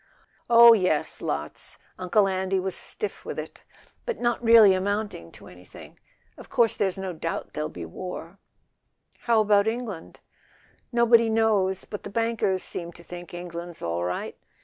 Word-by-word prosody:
"Oh, 235 0 +9
yes, 185 -8 0
lots: 75 +1 -4 0.2
Uncle 195 +3 +2
Andy 190 0 0
was 190 0 -2
stiff 430 - -4
with - - -6
it. - - -7 0.5
But 475 - -3
not 240 0 0
really 225 -4 +8
amounting 200 - -3
to - - -14
anything. 90 0 -14 0.4
Of - - -12
course 230 -2 +2
there's 190 -2 -1
no 190 -1 -4
doubt 165 0 -5
there'll 150 0 -3
be 85 -2 -8
war." 180 - -8 0.9
"How 230 -2 +4
about 205 0 +3
England?" 225 -7 -5 0.7
"Nobody 235 -1 +4
knows; 210 -4 +1
but 205 - -7
the - - -8
bankers 225 -3 0
seem 170 -1 -4
to 170 - -14
think 175 0 -10
England's 175 -1 -8
all 85 +1 -2
right." 90 +1 -3
190 Hz, 150 wpm, -25 LUFS, 175-225 Hz, 0.9 s, Oh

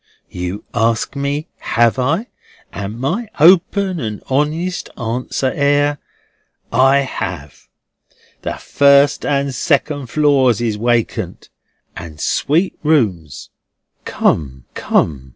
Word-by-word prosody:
You 90 +3 -5
ask 115 +2 0
me 140 +3 -2
have 120 +2 +1
I, 160 - 0 0.5
and 100 +4 -6
my 220 - -2
open 185 +3 +4
and 110 -5 -4
my 130 - -4
honest 160 +6 -1
answer 125 +3 -2
air, 145 0 +1 0.7
I 135 +2 +4
have. 135 - -6 0.7
The - - -4
first 140 0 +3
and 140 -1 0
second 145 0 0
floors 135 -4 +2
is 115 -3 -1
wacant, 120 +1 -2 0.5
and 80 -3 -9
sweet 165 - 0
rooms." 105 - 0 0.5
"Come, 65 -5 -1
come! 65 -4 -1
135 Hz, 105 wpm, -17 LUFS, 115-145 Hz, 0.7 s, open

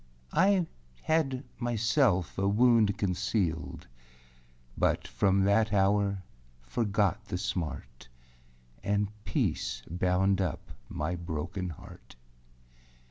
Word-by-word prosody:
I 190 0 +4 0.4
had 145 -5 +1 0.2
myself 115 - +1
a 95 0 0
wound 110 -1 +4
concealed, 95 -3 -1 0.9
But - - +1
from 95 -1 +2
that 105 +2 +3
hour 100 -1 +2 0.4
forgot 100 - 0
the 90 - -3
smart, 75 -11 -4 0.7
And 100 +1 0 0.2
peace - - -1
bound 90 +3 +1
up 90 -6 -3 0.2
my 75 +4 -2
broken 85 +2 -4
heart. 75 -4 -12
100 Hz, 90 wpm, -30 LUFS, 90-110 Hz, 0.9 s, I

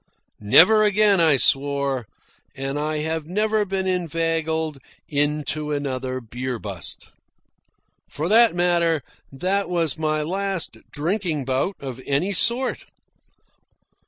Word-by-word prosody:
Never 180 - +6
again, 205 -1 +4
I 155 -4 +5
swore. 140 -3 +1 0.5
And 135 +2 -3
I 150 0 -1
have 160 -1 -3
never 210 +3 +1
been 190 -1 -2
inveigled 165 -3 -1 0.3
into 150 +1 -1
another 130 -3 -3
beer 125 +2 -5
bust. 100 -8 -6 1.0
For 155 +3 -3
that 225 0 +5
matter, 170 -3 +2 0.3
that 185 +8 -1
was 165 -5 +1
my 155 -1 0
last 190 - -3
drinking 160 -2 -2
bout 135 +9 -1
of 130 -2 -7
any 145 +9 0
sort. 235 +8 +1
160 Hz, 110 wpm, -22 LUFS, 140-185 Hz, 1.0 s, Never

